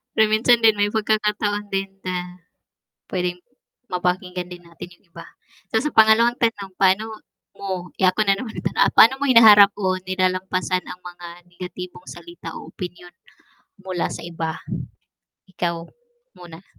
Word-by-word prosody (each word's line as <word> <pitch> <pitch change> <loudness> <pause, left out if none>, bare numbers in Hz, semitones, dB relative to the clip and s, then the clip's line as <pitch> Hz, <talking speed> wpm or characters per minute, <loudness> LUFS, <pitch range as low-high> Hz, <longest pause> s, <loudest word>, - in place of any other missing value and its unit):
Pero 220 - +5
minsan 235 +2 +4
din 220 -1 +6
may 205 0 +1
pagkakataon 210 -1 -1
din 195 0 -1
na 180 -1 -5 0.7
pwedeng 180 -1 -2 0.5
mapakinggan 180 0 -2
din 175 -1 -11
natin 170 0 -11
yung - - -35
iba 170 - -11 0.4
so 220 +4 0
sa 300 - -1
pangalawang 225 +2 +5
tanong 205 -5 -1
paano 210 +3 +2 0.4
mo 185 -3 -5
eh, 190 - +4
ako 185 +4 +2
na 195 -1 +2
naman 225 -2 -7 0.4
paano 265 +4 +7
mo 285 - 0
hinaharap 210 -5 +8
o 185 -2 -1
nilalampasan 185 0 0
ang 180 - -8
mga 175 -1 -10 0.2
negatibong 180 0 -9
salita 345 0 -10
o - - -10
opinyon 180 -1 -8 0.7
mula 185 -2 -2
sa - - -7
iba? 165 -1 -5 0.9
Ikaw 170 -2 -3 0.5
muna. 175 +1 -13
190 Hz, 140 wpm, -22 LUFS, 180-215 Hz, 0.9 s, hinaharap